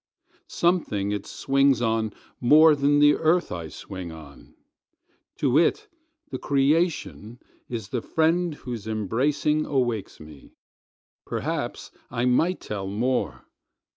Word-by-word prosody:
Something 135 - 0
it 105 -1 -4
swings 135 -1 +2
on 110 -2 0 0.3
more 150 +5 +6
than 145 +1 +2
the 145 0 +6
earth 170 +2 +1
I 85 -2 -5
swing 95 +1 -8
on; 80 -3 -14 0.8
To 140 -1 +3
it 425 - +1 0.4
the - - -4
creation 135 - 0 0.3
is 115 -5 -5
the 120 - -2
friend 165 +3 +1
whose 120 -6 -7
embracing 130 +8 0
awakes 120 -7 -1
me. 75 -2 -14 0.7
Perhaps - - -4 0.2
I 120 0 -1
might 160 +9 +2
tell 100 -2 -5
more. 120 +6 -2
125 Hz, 115 wpm, -25 LUFS, 105-150 Hz, 0.8 s, more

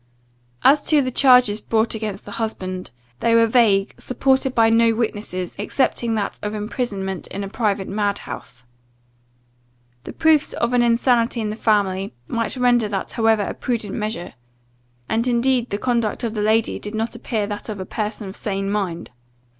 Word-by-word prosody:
As 290 +2 +6
to 300 -3 +3
the 255 - -2
charges 250 -5 +5
brought 225 0 +1
against 215 -3 -5
the - - -9
husband, 185 -4 -4 0.3
they 230 0 +3
were 230 0 +6
vague, 220 -4 +3
supported 265 +1 +1
by 225 -1 +5
no 230 0 +4
witnesses, 205 -5 -3
excepting 230 +1 0
that 205 -2 -3
of 210 +1 -3
imprisonment 205 -3 -3
in 200 - -5
a - - -4
private 200 -2 -1
madhouse. 200 - -4 1.4
The - - -6
proofs 315 -2 +3
of 235 +1 -1
an 245 - +4
insanity 235 0 +2
in 215 -2 -2
the - - -4
family, 200 - 0
might 230 +3 -2
render 245 -3 +3
that 195 -2 -4
however 225 -2 +2
a - - -3
prudent 225 -5 -3
measure; 210 -5 -4 0.7
and 230 +2 0
indeed 245 0 +2
the 200 - -2
conduct 235 -1 -1
of 230 -2 -2
the 210 - -2
lady 220 +1 +1
did 210 +1 -6
not 225 +1 -2
appear 225 -3 -2
that 205 +2 -6
of 210 -2 -5
a 185 - -4
person 210 0 -4
of 190 - -8
sane 195 -1 -2
mind. 190 -8 -3
220 Hz, 170 wpm, -21 LUFS, 205-235 Hz, 1.4 s, As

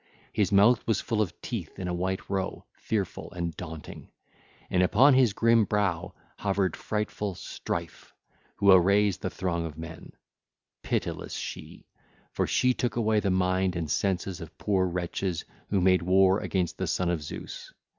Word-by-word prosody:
His 105 -3 +1
mouth 105 +5 +5
was 110 -3 +2
full 115 -2 -1
of 90 -6 -3
teeth 105 -11 -5
in 90 - -4
a 90 - -2
white 95 +2 -2
row, 95 -1 -3
fearful 105 -4 -3
and 85 -2 -3
daunting, 80 -3 -8 0.6
and 90 - +2
upon 120 +10 +6
his 130 -4 +5
grim 115 +1 +4
brow 100 -4 -1 0.2
hovered 100 -3 0
frightful 105 -2 -3
Strife - - -5 0.4
who 100 -1 +5
arrays 100 +1 +5
the - - -3
throng 85 -2 -2
of 80 -2 -6
men: 80 0 -9 0.7
pitiless - - -3
she, - - -7 0.5
for - - -1
she 125 0 +3
took 120 -1 -2
away 110 -2 +2
the 100 - 0
mind 95 0 +1
and 80 -3 -3
senses 95 +1 -1
of 80 - -10
poor 95 -3 +1
wretches 90 0 -2 0.2
who 100 - +2
made 95 0 +4
war 95 +2 +4
against 90 -4 -2
the - - -1
son 90 -1 0
of 85 -3 -1
Zeus. 75 - -8
95 Hz, 160 wpm, -28 LUFS, 90-105 Hz, 0.7 s, upon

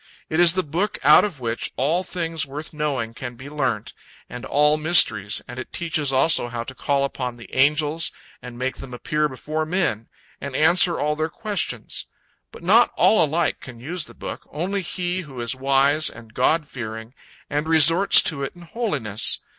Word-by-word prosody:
It 155 - 0
is 175 0 +7
the 185 - +1
book 175 +8 -2
out 150 +3 +7
of 180 -9 -4
which 115 -1 -3
all 155 +7 +1
things 165 -4 -2
worth 145 +4 -8
knowing 145 -7 -2
can 120 +1 -7
be 130 +4 -11
learnt, 130 -8 -2 0.3
and 125 0 -8
all 150 +1 +3
mysteries, 135 - +3
and 125 +1 -8
it 130 - -8
teaches 155 -4 -1
also 135 0 +3
how 120 -1 -5
to 130 - -9
call 140 +1 -1
upon 125 -3 -5
the 120 -5 -14
angels 150 +4 +2 0.3
and 125 -1 -10
make 130 +1 -3
them 125 -2 -8
appear 150 +4 -1
before 155 +4 -4
men, 155 - -2 0.3
and 140 -1 -6
answer 170 +3 +4
all 150 +1 0
their 155 +1 -2
questions. 210 +3 -3 0.4
But - - -13
not - - +5
all 215 -6 +4
alike 160 -1 0
can 120 -3 -11
use 160 +6 -2
the - - -14
book, - - -8
only 185 +6 -2
he 180 0 -3
who 135 -7 -10
is 120 +1 -2
wise 140 +3 +2
and 115 -1 -14
God 150 +5 +1
fearing, 110 -2 -7 0.3
and 150 +2 -2
resorts 165 +4 +6
to 150 -5 -1
it 135 - -4
in 175 - -13
holiness. 150 - -1
150 Hz, 185 wpm, -22 LUFS, 125-165 Hz, 0.4 s, is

